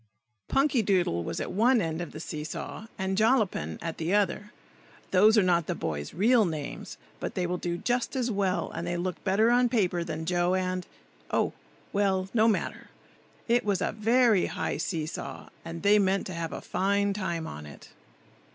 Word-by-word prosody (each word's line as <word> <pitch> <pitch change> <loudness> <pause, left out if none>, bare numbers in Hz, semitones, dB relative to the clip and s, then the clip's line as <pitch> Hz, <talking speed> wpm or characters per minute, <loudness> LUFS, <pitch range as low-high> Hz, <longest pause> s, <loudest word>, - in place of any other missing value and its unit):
PUNKYDOODLE 205 - +2
was - - -4
at - - -3
one 235 +5 +4
end 165 -2 -2
of 170 - -6
the 155 - -8
see 155 -2 -5
saw, 215 +7 -6
and 190 -1 -1
Jollapin 215 - +2
at 165 -1 -4
the 165 +5 +1
other. 205 0 0 0.6
(Those 210 +4 +6
are 210 - +6
not 175 -3 +2
the - - -1
boys' 75 -2 -4
real 225 +6 +4
names, 155 -6 -5 0.2
but - - -4
they 180 - 0
will 180 0 -2
do 175 -1 -2
just 245 +6 -1
as 250 -2 0
well, 195 -3 0
and 170 +1 -4
they 175 0 -1
look 180 0 -3
better 215 +5 +3
on 245 0 +4
paper 180 -7 +1
than 160 -1 -5
Joe, 175 +1 +1
and,—oh! 185 -1 -3 0.4
well, 195 -2 +1
no 225 -1 +4
matter!) 220 - -1 0.6
It 240 +1 +3
was 200 -3 +1
a - - 0
very 225 -2 +3
high - - -2
see 160 -4 -2
saw, 155 - -7
and 165 0 -7
they 205 +1 +6
meant 195 0 +1
to 185 - -5
have 165 -1 -4
a - - -5
fine 200 +1 +1
time 170 -5 -3
on 75 - -7
it. 75 - -13
190 Hz, 185 wpm, -28 LUFS, 170-215 Hz, 0.6 s, Those